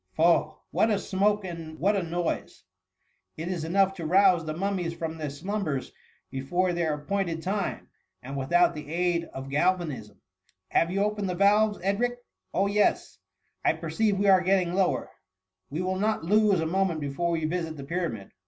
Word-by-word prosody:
Fob! 165 -1 +3
what 220 - +2
a 210 - +2
smoke 205 +1 +1
and 165 -3 -7
what 200 +6 +2
a 195 - +1
noise! 170 0 -3 0.7
It 165 +3 -4
is 175 -4 -2
enough 190 +3 +2
to 165 - -5
rouse 185 -1 +5
the 155 -1 -4
mum 195 +1 -1
mies 170 -1 -3
from 160 -1 -4
their 150 -2 -3
slumbers 155 -2 -3 0.4
before 175 +8 0
their 165 -3 0
appointed 165 +1 -2
time, 195 +1 -2 0.4
and 135 +3 -6
without 170 +7 +3
the 150 -2 -6 0.4
lud 170 - -11
of 135 +1 -7
galvanism. 150 - -1 0.5
Have 165 - +2
you 195 +2 +1
opened 205 -2 -1
the 180 - -2
valves, 205 +2 +4
Edric? 240 +6 0 0.3
Oh 195 - +1
yes! 205 +1 +1 0.4
I - - +4
perceive 215 -3 0
we 200 - +1
are 190 -2 +6
getting 185 -1 +2
lower; 185 -1 0 0.6
we 155 +6 -3
will 185 0 -1
not 215 -3 0
lose 205 0 +3
a - - 0
moment 180 -1 0
before 145 +4 -2
we 165 -2 0
visit 165 -1 -2
the 140 - -7
Pyramid. 145 - -3
175 Hz, 175 wpm, -27 LUFS, 160-195 Hz, 0.7 s, are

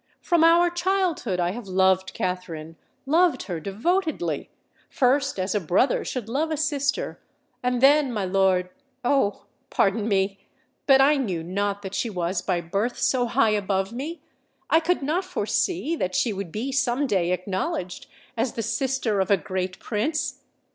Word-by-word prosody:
From 340 -2 +2
our 340 +1 +5
childhood 350 - 0
I 175 0 +1
have 225 +1 -7
loved 190 0 +2
Katherine—loved 180 - -1
her 175 -4 -4
devotedly,—first 260 - -1
as 185 +1 -1
a 210 - +1
brother 185 - +2
should 245 -5 -4
love 285 +7 -1
a 310 - -1
sister—and 280 -4 -3
then, 280 0 +5
my 210 -4 -2
lord—oh! 200 +6 0 0.2
pardon 205 +2 +1
me—but 200 +6 0
I 290 +2 +5
knew 190 -11 -2
not 200 +3 -2
that 195 0 -6
she 230 - -1
was 180 -2 -2
by 180 -3 -1
birth 200 +8 -2
so 245 -2 +1
high 235 -1 +3
above 195 -1 0
me—I 320 +3 -3
could 335 -2 0
not 320 +7 0
foresee 360 -2 -1
that 185 -6 -2
she 230 - +1
would 195 -3 -5
be 235 +8 -3
some 265 +1 +1
day 185 -8 +1
acknowledged 185 0 -3 0.3
as 230 +1 -1
the 230 - -3
sister 265 -5 0
of 190 - 0
a 200 - +5
great 185 +2 -4
Prince! 260 +8 -2
225 Hz, 145 wpm, -25 LUFS, 190-280 Hz, 0.3 s, our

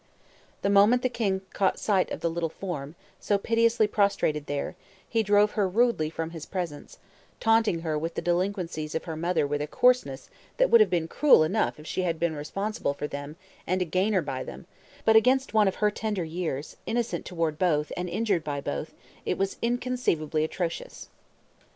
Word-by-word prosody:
The 200 - +2
moment 210 +5 +5
the 255 - +2
king 200 -6 -1
caught 190 -1 +1
sight 195 -4 +1
of - - -5
the 170 - +1
little 165 -1 -2
form, 155 -4 -6 0.2
so 205 - +1
piteously 230 +2 +2
prostrated 200 -8 +1
there, 145 +4 -3 0.3
he 230 - +1
drove 205 0 +4
her 200 -3 0
rudely 225 -6 +2
from 165 0 -4
his 165 -3 -8
presence, 175 -6 -5 0.4
taunting 225 -6 +3
her 155 -2 -1
with 165 +2 -4
the - - -2
delinquencies 175 -3 -1
of 160 - -1
her 165 -3 -5
mother 165 -1 0
with 145 +1 -2
a 150 - -2
coarseness 245 - +1 0.3
that - - +3
would 465 - +8
have 430 - +5
been 165 -2 0
cruel 275 - +5
enough 185 +1 0
if 150 - -12
she 185 - -2
had 170 -3 -1
been 170 -1 0
responsible 195 +1 -3
for 150 - -4
them 145 +1 -6 0.3
and 185 +2 +1
a - - -5
gainer 185 +2 +1
by 135 -3 -4
them, - - -9 0.4
but 220 - +5
against 255 +4 +4
one 215 -2 +5
of 190 - 0
her 210 -1 +2
tender 210 -3 -2
years, 160 -3 -4
innocent 235 0 -1
toward 165 -4 -2
both, 150 -5 +1
and 180 0 -3
injured 195 -3 0
by 145 -2 -3
both, 70 - -5 0.3
it - - -1
was 195 0 -1
inconceivably 235 -11 0
atrocious. 165 +1 -4
180 Hz, 190 wpm, -27 LUFS, 155-215 Hz, 0.4 s, would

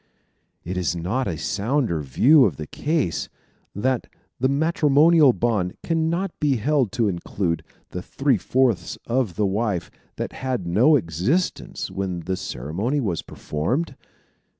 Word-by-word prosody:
Is 90 -1 -2
it - - -4
not 125 +9 -1
a 85 - -2
sounder 110 - 0
view 125 - +5
of 85 - 0
the 75 - -5
case, 150 - -1 0.5
that 125 +4 0 0.3
the 130 +2 +2
matrimonial 150 0 +5
bond 105 -7 -1
can 160 -1 0
not 180 +2 -1
be 145 -3 +2
held 130 0 +1
to 120 -3 +1
include 85 -1 -2 0.3
the 90 - -4
three 135 +5 +1
fourths 115 -6 +1
of 120 -7 0
the 105 - +1
wife 100 -2 -1 0.2
that - - -4
had 130 -7 -3
no 115 - +4
existence 105 - -1
when 95 -2 -3
the 95 +3 -2
ceremony 90 - -2
was 95 - -1
performed? 125 - -3
115 Hz, 140 wpm, -23 LUFS, 90-140 Hz, 0.5 s, view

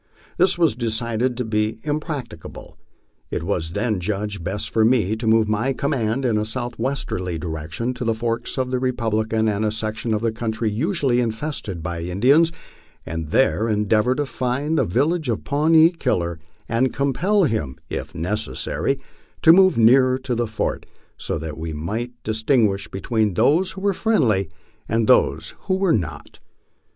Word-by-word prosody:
This 185 0 +4
was 165 -6 +3
decided 115 +1 -1
to 125 - -2
be 105 0 -1
impracticable. 145 - -5 0.5
It - - -3
was 85 -3 -2
then 105 -1 0
judged 100 0 -3
best 100 +4 -3
for 110 - +3
me 110 -3 +3
to 110 +1 -4
move 110 -1 +4
my 110 +6 0
command 130 -3 -1
in 110 -4 +2
a - - 0
southwesterly 120 -6 -3
direction 80 +8 -4
to 125 - -5
the 115 -1 0
forks 115 +2 -2
of 130 -1 -1
the 130 - 0
Republican, 110 -3 0
a 105 0 +1
section 110 +1 -2
of 105 - -3
country 110 -1 -2
usually 135 - +1
infested 110 - -3
by 85 -1 -4
Indians, 130 - +3 0.5
and 80 -1 -5
there 115 +1 +2
endeavor 105 +3 +2
to 145 - -1
find 135 +4 -2
the - - +2
village 145 - 0
of 110 - -1
Pawnee 160 +3 +4
Killer, 85 - -1 0.3
and 120 +3 +1
compel 180 +10 +2
him, 110 - -1
if - - -6
necessary, 90 -5 -2 0.4
to 160 - +9
move 190 -3 +5
nearer 130 +3 +5
to 130 -1 -3
the 120 0 0
fort, 110 0 -3 0.3
so - - -3
that 80 0 -6
we 80 0 -4
might 110 +11 -4
distin 110 +3 +2
guish 100 0 -4
between 105 0 -1
those 150 - +3
who 190 - -8
were 200 0 +2
friendly 115 - +1 0.4
and 115 0 +1
those 80 +3 +3
who 185 - +1
were 190 -2 +2
not. 90 -8 -4
115 Hz, 160 wpm, -22 LUFS, 105-130 Hz, 0.5 s, to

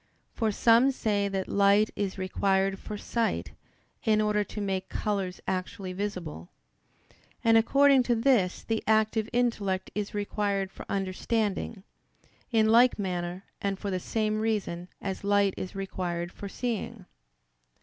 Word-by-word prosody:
For 220 -3 0
some 230 +5 +5
say 210 -6 0
that 195 -1 -2
light 200 +2 +4
is 200 -2 -2
required 195 +1 +1
for 210 - -6
sight, 230 +2 -1 0.5
in 215 -2 +3
order 210 -1 +2
to 210 - -8
make 190 -2 -2
colors 195 -4 -2
actually 185 0 -3
visible. 180 - -5 0.9
And 225 -1 +5
according 275 +4 +5
to 240 - +4
this 225 -6 +2
the 225 -1 -2
active 220 0 +2
intellect 220 -6 0
is 210 0 -3
required 200 -1 -1
for - - -11
understanding, 200 +1 -1 0.7
in 220 -2 +3
like 240 +2 +6
manner 180 -2 -3 0.2
and 200 -1 -1
for 200 0 -4
the 185 - -1
same 215 +2 -1
reason 205 -6 -1 0.2
as 195 0 -4
light 200 -1 +3
is 185 - -6
required 175 -3 -3
for 200 - -8
seeing. 230 -3 -4
205 Hz, 140 wpm, -28 LUFS, 190-220 Hz, 0.9 s, like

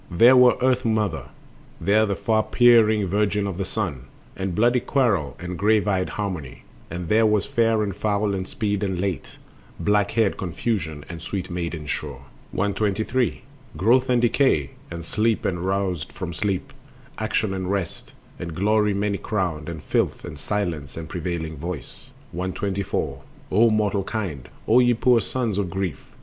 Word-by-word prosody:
There 115 +9 +6
was 125 -1 +6
Earth 130 -1 +3
mother, 110 -7 0 0.5
There 110 +2 +3
the 100 - 0
far 110 +1 +1
peering 110 -3 +5
Virgin 105 +2 +1
of 95 -2 -4
the 95 - -1
Sun, 90 - -3 0.3
And 95 -2 -3
bloody 120 +4 +4
Quarrel 115 - +1
and 90 -1 -6
grave 105 +1 +3
eyed 95 -2 +1
Harmony, 90 -10 -4 0.3
And 85 +1 -5
there 110 +4 +4
was 105 -2 +2
Fair 115 -2 +2
and 100 -3 -3
Foul 105 -1 0
and 95 -1 -3
Speed 105 -2 -2
and 95 -3 -1
Late, 95 -2 -3 0.4
Black 105 0 +2
haired 110 -3 +2
Confusion 85 -5 -2
and 85 -2 -8
sweet 90 +1 -4
maiden 85 -3 -4
Sure. - - -4 0.3
123. 110 +5 0 0.3
Growth 125 +6 +3
and 120 -1 +3
Decay, 115 - +2 0.2
and 85 0 -7
Sleep 110 +4 0
and 90 -2 0
Roused 95 -3 -1
from 85 -2 -5
sleep, 95 +2 -2 0.5
Action 110 -2 0
and 95 -1 -3
Rest, 95 -4 -3 0.3
and 85 -2 -5
Glory 105 +2 +2
many 100 0 -1
crowned, 85 -7 -2
And 80 -3 -7
Filth, - - 0
and 75 - -8
Silence 80 -8 -3
and 80 -1 -6
prevailing 85 -2 -4
Voice. 80 -2 -7 0.2
124. 95 -5 -2 0.3
O 115 +5 +5
mortal 105 -2 +1
kind! 90 - -4 0.2
O 115 +3 +6
ye 120 -1 +4
poor 120 0 +4
sons 115 -6 -2
of 95 -3 -1
grief! 95 -5 -4
100 Hz, 160 wpm, -24 LUFS, 90-110 Hz, 0.5 s, There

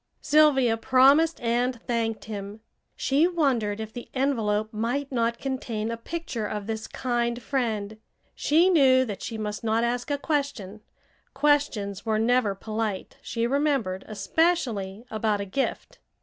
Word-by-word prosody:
Sylvia 275 -6 +4
promised 275 +7 +4
and 240 +1 0
thanked 230 -2 -2
him. 205 0 -7 0.3
She 290 +5 +2
wondered 255 - 0
if 220 0 -6
the 240 - -8
envelope 220 -5 0
might 245 +6 -2
not 235 -2 0
contain 230 -5 -3
a - - -2
picture 240 -4 -4
of 210 -1 -4
this 220 0 -4
kind 240 -1 -1
friend. 220 -5 -2 0.4
She 335 +5 +3
knew 260 -6 +5
that 205 -5 -6
she 225 - -5
must 210 0 -4
not 225 +1 +1
ask 240 +2 -1
a 285 - 0
question; 280 - -3 0.5
questions 270 -9 +1
were 220 -1 0
never 225 -2 +2
polite, 215 -1 -4
she 230 -1 -2
remembered, 265 -8 0
especially 215 - 0
about 215 -1 0
a 200 - -3
gift. 260 +8 -3
235 Hz, 140 wpm, -26 LUFS, 215-275 Hz, 0.5 s, knew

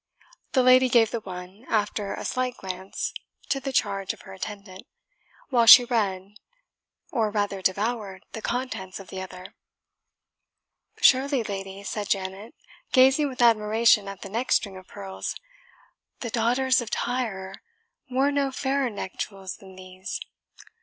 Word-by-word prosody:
The 260 -3 +4
lady 255 0 +6
gave 230 -3 +4
the 235 - -2
one, 185 +1 -9
after 205 -1 -1
a - - -6
slight 255 -1 -1
glance, 190 0 -5 0.4
to 275 - +1
the 270 0 -4
charge 195 -6 0
of - - -15
her 190 - -11
attendant, 195 -1 -8 0.6
while 240 -4 +3
she 245 +2 +11
read, 205 -4 -1 0.7
or 225 -5 +1
rather 205 -2 -1
devoured, 200 0 -1
the 220 - -6
contents 235 -8 -3
of 195 - -11
the 190 - -5
other. 185 0 -9 1.5
"Surely, 270 -1 +4
lady," 195 -1 -6
said 205 0 -4
Janet, 195 +3 -3 0.4
gazing 270 +3 +5
with 250 -2 -1
admiration 220 -2 +4
at 195 -1 -8
the 195 - -7
neck 235 +5 -3
string 200 -3 +2
of 185 0 -12
pearls, 195 -1 -6 0.9
"the 235 - -4
daughters 250 +3 +2
of 235 - -6
Tyre 215 -8 -2 0.6
wore 265 +3 +2
no 280 -1 0
fairer 265 0 0
neck 200 -3 -7
jewels 195 -2 -5
than 190 -1 -14
these. 185 +2 -7
210 Hz, 145 wpm, -26 LUFS, 190-250 Hz, 1.5 s, she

